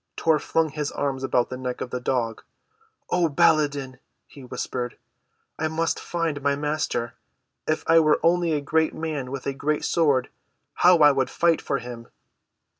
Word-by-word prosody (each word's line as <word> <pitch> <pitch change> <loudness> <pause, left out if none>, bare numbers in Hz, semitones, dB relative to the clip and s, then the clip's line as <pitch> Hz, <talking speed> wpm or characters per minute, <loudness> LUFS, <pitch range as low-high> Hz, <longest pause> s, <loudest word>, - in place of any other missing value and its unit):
Tor 160 -2 +3
flung 165 -1 0
his 150 -1 -3
arms 135 -2 -2
about 125 -2 +1
the 130 - -4
neck 125 -1 -4
of 125 - -5
the 125 - -2
dog. 120 -3 -1 0.7
"Oh, 175 -2 +2
Baladan," 140 -3 +2 0.3
he 140 - -14
whispered, 125 -1 -4 0.6
"I 160 - +1
must 165 +1 -1
find 165 -4 -2
my 140 0 +1
Master. 145 -5 -2 0.5
If 155 0 0
I 165 0 +6
were 155 -2 +3
only 170 0 +3
a 150 - 0
great 160 +2 +1
man 155 -5 -4
with 135 0 -6
a 140 - -1
great 150 +2 -1
sword 145 -6 +2 0.5
how 180 0 +7
I 145 - +8
would 135 -2 0
fight 170 -1 +2
for 140 - -1
him!" 120 -2 -8
145 Hz, 170 wpm, -24 LUFS, 130-160 Hz, 0.7 s, I